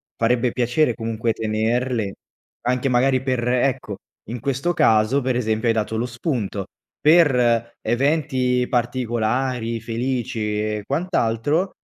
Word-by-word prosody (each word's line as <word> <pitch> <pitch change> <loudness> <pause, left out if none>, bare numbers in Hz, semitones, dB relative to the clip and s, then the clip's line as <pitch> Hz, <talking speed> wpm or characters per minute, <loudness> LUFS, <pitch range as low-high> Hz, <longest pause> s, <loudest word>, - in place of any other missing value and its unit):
farebbe 120 +1 +1
piacere 125 +3 +1
comunque 115 0 -2
tenerle 110 0 -1 0.5
anche 125 +2 0
magari 130 +1 +2
per 130 -3 -1
ecco, 125 -4 0 0.3
in 120 +1 -4
questo 140 +7 -1
caso, 110 0 +3
per 125 -1 0
esempio, 110 -1 0
hai 115 - +4
dato 110 0 -1
lo 115 - 0
spunto: 120 - -3 0.3
per 125 -8 +3
eventi 125 0 +1
particolari, 120 -1 -1
felici 115 -2 -2
e 105 -1 -2
quant'altro, 150 - 0
120 Hz, 115 wpm, -22 LUFS, 115-130 Hz, 0.5 s, hai